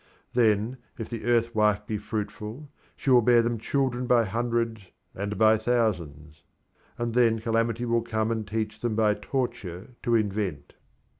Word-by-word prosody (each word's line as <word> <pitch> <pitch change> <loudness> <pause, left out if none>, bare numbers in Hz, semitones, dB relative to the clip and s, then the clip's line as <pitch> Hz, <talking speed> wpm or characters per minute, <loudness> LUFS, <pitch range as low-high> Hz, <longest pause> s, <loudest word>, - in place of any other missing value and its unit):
Then, 115 +1 +2 0.2
if 115 0 -6
the 115 -2 -5
Earth 115 -1 +2
wife 105 -1 +2
be 105 -1 -3
fruitful, 105 +6 -5 0.2
she 135 - -1
will 125 -1 +7
bear 120 0 +5
them 115 -1 -1
children 125 0 -1
by 120 -2 +4
hundreds 115 +1 -1 0.3
and 100 +1 -4
by 110 +1 +5
thousands; 85 -10 -1 0.6
and 120 -1 -2
then 115 -2 +4
calamity 115 +1 0
will 115 0 +2
come 110 -1 -1
and 110 -2 -2
teach 110 0 -3
them 120 -3 -1
by 105 -1 +3
torture 120 -5 -4
to 120 - +1
invent. 100 -8 -1
115 Hz, 155 wpm, -27 LUFS, 105-120 Hz, 0.6 s, will